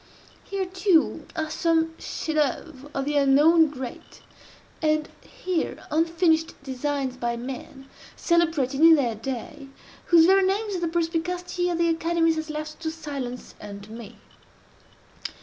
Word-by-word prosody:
Here, 390 Hz, -1 st, -3 dB
too, 370 Hz, -2 st, +1 dB
are 315 Hz, -1 st, -2 dB
some 325 Hz, 0 st, +1 dB
chefs 315 Hz, -, -4 dB
d'oeuvre 290 Hz, -2 st, -2 dB
of 275 Hz, -2 st, -2 dB
the 295 Hz, 0 st, 0 dB
unknown 295 Hz, +4 st, +5 dB
great; 265 Hz, -4 st, -9 dB, 0.6 s
and 310 Hz, -1 st, +1 dB
here, 365 Hz, -3 st, -4 dB
unfinished 325 Hz, 0 st, +2 dB
designs 270 Hz, -1 st, -3 dB
by 235 Hz, -1 st, -2 dB
men, 270 Hz, +2 st, -8 dB, 0.3 s
celebrated 320 Hz, -6 st, +1 dB
in 325 Hz, 0 st, +9 dB
their 250 Hz, -6 st, +1 dB
day, 255 Hz, +4 st, -6 dB, 0.4 s
whose 335 Hz, -2 st, +6 dB
very 385 Hz, +2 st, +5 dB
names 390 Hz, 0 st, 0 dB
the 345 Hz, -, -1 dB
perspicacity 350 Hz, +2 st, -1 dB
of 345 Hz, -, -1 dB
the 340 Hz, 0 st, +2 dB
academies 330 Hz, 0 st, +1 dB
has 315 Hz, 0 st, -4 dB
left 305 Hz, 0 st, -5 dB
to 325 Hz, -1 st, -3 dB
silence 280 Hz, -6 st, -6 dB
and 200 Hz, -1 st, -9 dB
to 210 Hz, -, -13 dB
me. 230 Hz, -1 st, -9 dB
315 Hz, 135 wpm, -25 LUFS, 270-335 Hz, 0.6 s, in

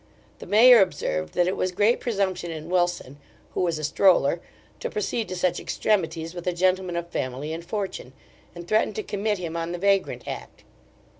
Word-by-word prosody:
The -, -, -10 dB
mayor 230 Hz, +4 st, +8 dB
observed 80 Hz, -, -1 dB
that 175 Hz, -, +3 dB
it 185 Hz, -, 0 dB
was 185 Hz, -, -1 dB
great 210 Hz, +6 st, +2 dB
presumption 190 Hz, -6 st, -1 dB
in 160 Hz, +1 st, -7 dB
Wilson, 175 Hz, -6 st, 0 dB, 0.3 s
who -, -, -1 dB
was 170 Hz, -3 st, 0 dB
a 155 Hz, -, -6 dB
stroller, 170 Hz, 0 st, +3 dB, 0.4 s
to -, -, -3 dB
proceed 210 Hz, +2 st, -2 dB
to 185 Hz, -, -4 dB
such 180 Hz, -1 st, 0 dB
extremities 165 Hz, -5 st, -1 dB
with 175 Hz, 0 st, -8 dB
a 180 Hz, -, +1 dB
gentleman 185 Hz, 0 st, +1 dB
of 170 Hz, 0 st, -3 dB
family 135 Hz, +2 st, -3 dB
and 165 Hz, +1 st, -6 dB
fortune; 190 Hz, -8 st, -5 dB, 0.4 s
and 175 Hz, 0 st, -9 dB
threatened 215 Hz, 0 st, +1 dB
to 215 Hz, -, -3 dB
commit 205 Hz, +1 st, -1 dB
him 170 Hz, -2 st, -5 dB
on 165 Hz, +1 st, -3 dB
the -, -, -3 dB
vagrant 195 Hz, +1 st, +1 dB
act. -, -, -7 dB
180 Hz, 190 wpm, -25 LUFS, 165-200 Hz, 0.4 s, mayor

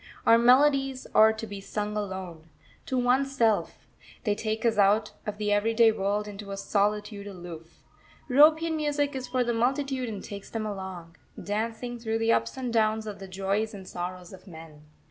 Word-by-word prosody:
Our 230 Hz, 0 st, +6 dB
melodies 270 Hz, +1 st, +4 dB
are 220 Hz, 0 st, +7 dB
to 220 Hz, +1 st, -6 dB
be 200 Hz, -2 st, -8 dB
sung 210 Hz, +1 st, -4 dB
alone, 190 Hz, -6 st, -5 dB, 0.4 s
to 260 Hz, -, -1 dB
oneself; 250 Hz, -3 st, +1 dB, 0.4 s
they 210 Hz, -, +1 dB
take 220 Hz, +2 st, -3 dB
us 225 Hz, -2 st, +2 dB
out 205 Hz, +2 st, +3 dB, 0.2 s
of 210 Hz, 0 st, -3 dB
the 210 Hz, -1 st, -1 dB
everyday 225 Hz, +2 st, +4 dB
world 205 Hz, 0 st, -1 dB
into 205 Hz, 0 st, -8 dB
a 195 Hz, -, -5 dB
solitude 205 Hz, 0 st, -1 dB
aloof. 175 Hz, -4 st, -10 dB, 0.4 s
European 315 Hz, +4 st, +5 dB
Music 290 Hz, -1 st, -1 dB
is 255 Hz, -1 st, -4 dB
for 250 Hz, 0 st, 0 dB
the 240 Hz, 0 st, -1 dB
multitude 260 Hz, +1 st, 0 dB
and 205 Hz, -3 st, -6 dB
takes 200 Hz, -1 st, -8 dB
them 225 Hz, -1 st, -3 dB
along, 190 Hz, -5 st, -7 dB, 0.2 s
dancing, 230 Hz, +3 st, -3 dB
through 225 Hz, -1 st, -1 dB
the 225 Hz, 0 st, +2 dB
ups -, -, -1 dB
and 250 Hz, -3 st, -3 dB
downs 220 Hz, -1 st, +2 dB
of 210 Hz, -2 st, -7 dB
the 195 Hz, -, -8 dB
joys 195 Hz, +3 st, -2 dB
and 190 Hz, -2 st, -10 dB
sorrows 180 Hz, 0 st, -6 dB
of 190 Hz, +1 st, -14 dB
men. 160 Hz, -3 st, -12 dB
215 Hz, 175 wpm, -27 LUFS, 195-245 Hz, 0.4 s, are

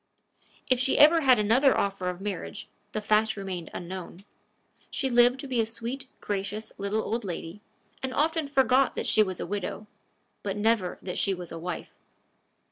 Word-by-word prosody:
If 255 Hz, -1 st, +3 dB
she 260 Hz, +1 st, +2 dB
ever 315 Hz, +3 st, +7 dB
had 260 Hz, -4 st, +6 dB
another 230 Hz, +6 st, +4 dB
offer 195 Hz, -2 st, -1 dB
of 180 Hz, 0 st, -5 dB
marriage, 205 Hz, 0 st, -5 dB, 0.2 s
the 215 Hz, -, -3 dB
fact 215 Hz, +1 st, +2 dB
remained 185 Hz, -4 st, -5 dB
unknown. 185 Hz, +1 st, -7 dB, 0.6 s
She 265 Hz, -2 st, -1 dB
lived 245 Hz, +2 st, +5 dB
to 280 Hz, -, -7 dB
be 250 Hz, -3 st, +1 dB
a -, -, 0 dB
sweet, 235 Hz, +4 st, -5 dB
gracious 205 Hz, +2 st, -3 dB
little 200 Hz, +2 st, -1 dB
old 230 Hz, +2 st, -2 dB
lady 175 Hz, +1 st, -6 dB, 0.4 s
and 265 Hz, -, -2 dB
often 315 Hz, +2 st, +1 dB
forgot 270 Hz, -1 st, +3 dB
that -, -, -2 dB
she 215 Hz, -, +4 dB
was 190 Hz, -4 st, 0 dB
a -, -, -3 dB
widow, 205 Hz, +1 st, -4 dB, 0.6 s
but 200 Hz, 0 st, -3 dB
never 210 Hz, -3 st, +1 dB
that 180 Hz, -, -3 dB
she 195 Hz, -, +1 dB
was 180 Hz, -1 st, -8 dB
a 165 Hz, -, -6 dB
wife. 180 Hz, +1 st, -5 dB
215 Hz, 175 wpm, -27 LUFS, 190-255 Hz, 0.6 s, ever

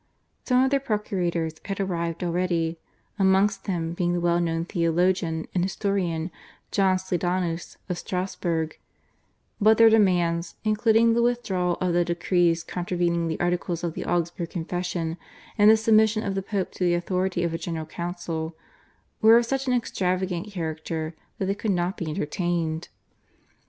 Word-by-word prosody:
Some 255 Hz, 0 st, +4 dB
of 265 Hz, -, +1 dB
their 280 Hz, -, +3 dB
procurators 180 Hz, -, -1 dB
had 195 Hz, -1 st, -4 dB
arrived 170 Hz, -3 st, -2 dB
already, 170 Hz, -2 st, 0 dB, 0.4 s
amongst 195 Hz, +1 st, +3 dB
them 170 Hz, -3 st, -2 dB
being 175 Hz, 0 st, 0 dB
the 175 Hz, -, 0 dB
well 170 Hz, 0 st, +2 dB
known 165 Hz, -1 st, -1 dB
theologian 170 Hz, -1 st, +1 dB
and 180 Hz, -, +1 dB
historian 185 Hz, -4 st, -1 dB, 0.4 s
John 190 Hz, -2 st, +3 dB
Sleidanus 180 Hz, -2 st, -2 dB
of 180 Hz, -1 st, -3 dB
Strassburg, 175 Hz, -3 st, -2 dB, 0.8 s
but 215 Hz, +1 st, +6 dB
their 225 Hz, -1 st, +7 dB
demands, 175 Hz, -5 st, +2 dB
including 225 Hz, +1 st, +4 dB
the 235 Hz, -, +2 dB
withdrawal 195 Hz, -8 st, 0 dB
of 180 Hz, -1 st, 0 dB
the 175 Hz, 0 st, +3 dB
decrees 170 Hz, -1 st, +1 dB
contravening 175 Hz, -1 st, -1 dB
the 160 Hz, -, -3 dB
articles 175 Hz, -1 st, -1 dB
of 170 Hz, -2 st, -2 dB
the -, -, -4 dB
Augsburg 170 Hz, -1 st, -1 dB
Confession 175 Hz, -1 st, -3 dB, 0.4 s
and 210 Hz, -1 st, +6 dB
the 220 Hz, -, +7 dB
submission 220 Hz, 0 st, +3 dB
of 200 Hz, -, -2 dB
the 195 Hz, -, -1 dB
Pope 195 Hz, -1 st, -2 dB
to -, -, -4 dB
the 175 Hz, -1 st, +3 dB
authority 180 Hz, 0 st, -1 dB
of 170 Hz, -1 st, -1 dB
a 165 Hz, -, -2 dB
General 165 Hz, -1 st, -4 dB
Council, 170 Hz, -1 st, -4 dB, 0.7 s
were 225 Hz, +1 st, +8 dB
of 240 Hz, -, +3 dB
such 270 Hz, +2 st, -2 dB
an 255 Hz, -, +2 dB
extravagant 185 Hz, -5 st, -1 dB
character 160 Hz, -1 st, -4 dB, 0.2 s
that 195 Hz, -, -1 dB
they 195 Hz, -, +1 dB
could 210 Hz, +2 st, -4 dB
not 180 Hz, 0 st, 0 dB
be 165 Hz, -, -4 dB
entertained. 160 Hz, +1 st, -2 dB
175 Hz, 155 wpm, -25 LUFS, 170-195 Hz, 0.8 s, were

